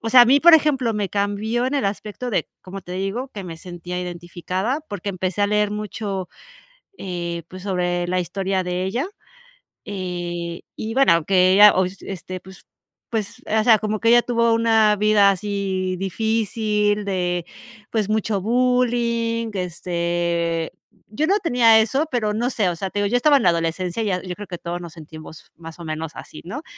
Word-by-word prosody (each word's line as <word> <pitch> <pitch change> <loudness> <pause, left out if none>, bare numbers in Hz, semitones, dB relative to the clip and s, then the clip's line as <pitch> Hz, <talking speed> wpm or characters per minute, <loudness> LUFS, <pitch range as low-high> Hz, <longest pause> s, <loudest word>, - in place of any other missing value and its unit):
o 225 - -3
sea, 250 0 +9
a - - +7
mí, 275 +4 +5
por 345 +1 +8
ejemplo, 275 -7 +2
me 205 -2 -1
cambió 205 +4 -1
en 260 - -2
el 275 -8 +1
aspecto 210 +4 -4
de, 210 - -1
como 195 +1 -8
te 180 - -9
digo, 195 +8 -3
que 200 - -6
me 165 -2 -7
sentía 175 +1 -7
identificada 180 - -3
porque 205 -2 -5
empecé 185 +1 -3
a - - +4
leer 210 0 +1
mucho, 205 -2 -4 0.7
eh, 175 -2 -4
pues, 185 0 -10
sobre 175 -2 -1
la 185 0 +1
historia 190 +1 -2
de 180 +1 -2
ella. 240 - -1 0.8
Eh, 175 -3 -4 0.2
y 220 +1 -4
bueno, 170 - +4
que 185 0 +4
ella, 210 +1 +8
ois 185 +1 -1
este, 185 -1 -6
pues 190 +1 -15 0.5
pues, 220 -3 -4
o 220 0 +1
sea, 225 -1 +6
como 215 0 -2
que 230 +2 +2
ella 240 0 +6
tuvo 235 -1 +2
una 225 -2 +4
vida 210 -1 +5
así 195 -2 -2
difícil, 210 +1 0
de, 180 -3 -1 0.5
pues, 215 -2 0
mucho 215 -2 0
bullying, 235 -1 +1
este, 170 -2 -1 0.4
yo 260 +10 -1
no 400 +4 +3
tenía 245 - +5
eso, 265 +8 +1
pero 215 -4 0
no 235 +3 0
sé, 205 -7 +1
o 175 - -3
sea, 190 +3 -4
te 205 - -2
digo, 205 - +1
yo 240 - 0
estaba 285 +3 +5
en 255 - -1
la 180 - +5
adolescencia 170 +4 -1
y - - -2
ya, 185 -2 0
yo 185 -1 -5
creo 205 +1 -9
que 175 - -6
todos 175 +1 -5
nos 170 -2 -9
sentimos 155 -1 -12
más 165 -1 -10
o 170 - -8
menos 155 0 -4
así, 155 - -10
¿no? 245 - -6
200 Hz, 190 wpm, -22 LUFS, 180-225 Hz, 0.8 s, sea